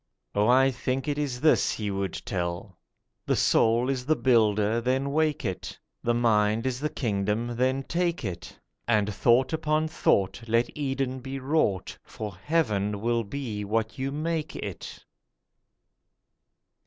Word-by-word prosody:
Oh, 105 +1 +2
I 130 +2 +5
think 130 +2 -2
it 145 0 -1
is 130 -4 -2
this 155 - +4
He 105 -2 -3
would 95 -2 -3
tell: 90 +1 -4 0.5
'The - - +2
soul 115 +2 +3
is 130 -2 -1
the 155 - +4
builder—then 115 +2 +2
wake 155 -2 +1
it; 95 -3 -4 0.2
The 120 0 +1
mind 110 -1 +2
is 130 -1 -1
the 150 +2 -1
kingdom—then 120 +2 -1
take 170 -2 -1
it; 90 -3 -6 0.3
And 105 -3 +2
thought 125 +7 +3
upon 155 0 +1
thought 100 -8 +1
let 115 +2 +1
Eden 135 -2 -2
be 135 +1 -6
wrought, 130 - 0
For 105 -2 -7
heaven 105 - 0
will 115 0 +1
be 110 -2 -4
what 110 +4 -2
you 135 +1 -1
make 155 +1 -2
it. 100 -4 -7
120 Hz, 140 wpm, -27 LUFS, 105-135 Hz, 0.5 s, I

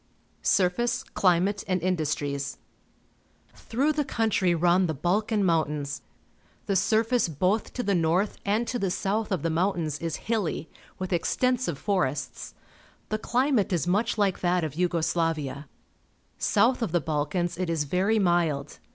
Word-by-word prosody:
Surface, 235 +7 +1
Climate, 190 +1 +1
and 185 -1 +1
Industries. 145 -5 -2 0.5
— - - -37 0.2
Through 275 +7 +2
the 295 0 0
country 215 -8 +1
run 175 +2 +3
the 160 - -2
Balkan 205 - +1
Mountains. 150 -4 0 0.6
The 200 - 0
surface 225 +3 +2
both 185 +8 0
to 250 - -3
the 200 - +1
north 175 +4 +1
and 210 +4 +1
to 245 - -2
the 195 - 0
south 210 +4 -1
of 185 -6 -1
the 165 - 0
mountains 165 -3 0
is 165 -1 -3
hilly, 205 -8 -2 0.3
with 185 0 -3
extensive 250 - 0
forests. 140 - -2 0.5
The 215 - -1
cUmate 250 -3 +1
is 170 -4 0
much 205 +6 +1
like 200 -3 +1
that 180 -1 +1
of 155 -4 -3
Yugo 175 -1 0
Sla\aa. 155 -4 -1 0.7
South 250 +1 +3
of 215 -8 -2
the 175 - +4
Balkans 160 +3 -2
it 185 -2 -1
is 165 -3 0
very 185 +9 +1
mild. 170 -7 +1
180 Hz, 150 wpm, -27 LUFS, 160-210 Hz, 0.7 s, the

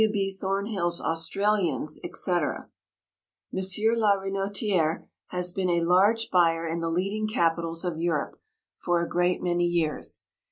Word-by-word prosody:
Thornhill's 195 -3 0
Australians, 165 -1 0
etc. 175 -5 -2 0.8
M. - - -1 0.4
la 210 -2 +4
Renotiérè 195 -3 -1 0.2
has 180 0 -3
been 185 0 -1
a 170 -1 +2
large 200 +6 +3
buyer 165 -2 +3
in 165 +1 -2
the 165 0 -2
leading 195 +6 -1
capitals 165 -4 0
of 170 -3 -2
Europe 165 -3 -2 0.4
for 175 -1 +1
a 170 - -1
great 175 +1 0
many 175 -1 +1
years. 170 -3 -1
175 Hz, 125 wpm, -27 LUFS, 165-195 Hz, 0.8 s, la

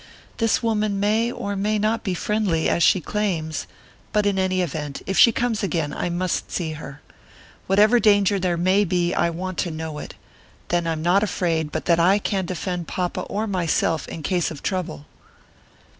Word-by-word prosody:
This 225 +1 +1
woman 215 -3 0
may 220 +4 +1
or 200 -4 -4
may 210 +2 0
not 215 +2 0
be 190 -4 -1
friendly, 195 -4 0
as - - +1
she 185 - +5
claims, 165 -5 -2 0.4
but 210 -1 +1
in 200 -1 +1
any 185 0 +1
event, 145 -3 -5
if 195 - -2
she 235 - +7
comes 230 -1 -1
again, 165 -7 -1
I - - -2
must 175 +1 -2
see 165 -3 -2
her. 150 -2 -9 0.7
Whatever 210 +5 +5
danger 205 -2 +4
there 180 -2 0
may 185 +4 +3
be 175 -2 0
I 170 - +2
want 185 +2 -5
to 180 - 0
know 160 -1 -5
it; - - -8 0.5
then 175 -1 +1
I'm 160 -1 -2
not 180 +4 +4
afraid 165 -7 -1
but - - -3
that 170 -1 +3
I 185 +4 +5
can 195 -3 -2
defend 180 -1 -3
papa 180 -1 -2
or 210 +2 -3
myself 170 -5 0
in 160 - -7
case 175 +1 0
of 150 -4 -9
trouble." 180 -6 -3
185 Hz, 185 wpm, -23 LUFS, 165-205 Hz, 0.7 s, she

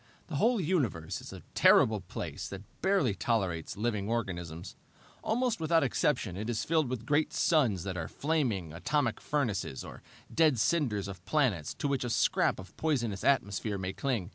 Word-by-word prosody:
"The 150 - -2
whole 230 - +3
universe 145 - -1
is - - -9
a - - -10
terrible 110 -2 +5
place 90 - -6
that 100 0 -7 0.2
barely 190 - +2
tolerates 95 -7 -1
living 105 -2 -1
organisms. 85 -7 -3 0.5
Almost 240 0 0
without 160 0 +3
exception 110 -7 0
it 105 +4 -4
is 110 -2 -1
filled 160 -5 +1
with 120 -3 -4
great 150 +4 +2
suns 125 - +2
that 95 -2 -4
are 80 -2 -3
flaming, 125 - -1
atomic 120 - 0
furnaces, 110 - -1
or - - -10 0.3
dead 155 -5 +4
cinders 110 - +1
of 95 -3 -8
planets 110 - +1
to - - -2
which 140 -2 0
a 120 - -2
scrap - - +2
of 95 -1 -11
poisonous 120 -11 -1
atmosphere 105 -5 +1
may 95 0 -3
cling. 120 -9 -2
115 Hz, 165 wpm, -31 LUFS, 95-150 Hz, 0.5 s, terrible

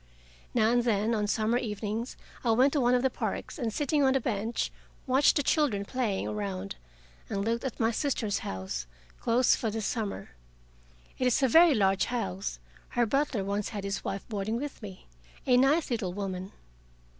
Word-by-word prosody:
Now 225 -1 +4
and 240 0 +3
then 220 -1 +1
on 210 -2 0
summer 220 +3 +1
evenings 215 +1 -4 0.3
I 240 - 0
went 260 +4 +4
to 290 - +2
one 245 0 +4
of 250 - +1
the 265 - +2
parks, - - -4
and 235 -4 -1
sitting 290 +4 +1
on 265 0 +4
a - - +4
bench, 225 -1 -2 0.3
watched 265 +2 +4
the 290 - +2
children 255 -10 +1
playing 215 - -1
around, 100 -4 -4 0.5
and 200 0 -2
looked 230 +1 0
at 265 -4 -4
my 225 0 +3
sister's 230 -5 -1
house, 95 -11 -5 0.3
closed 240 +2 +3
for 225 - 0
the 220 +1 -3
summer. 215 -1 -3 0.9
It 255 - +2
is 250 +3 +2
a - - +6
very 325 +3 +7
large 195 -3 +3
house: 195 - -3 0.3
her 240 - +2
butler 275 -3 0
once 200 +1 -2
had 205 -2 -5
his 200 0 -3
wife 195 0 -4
boarding 215 +1 -2
with 285 +1 -6
me 195 -4 -9 0.4
a 250 - +4
nice 275 +4 +3
little 210 -7 -1
woman. 190 -1 -4
225 Hz, 180 wpm, -29 LUFS, 200-255 Hz, 0.9 s, very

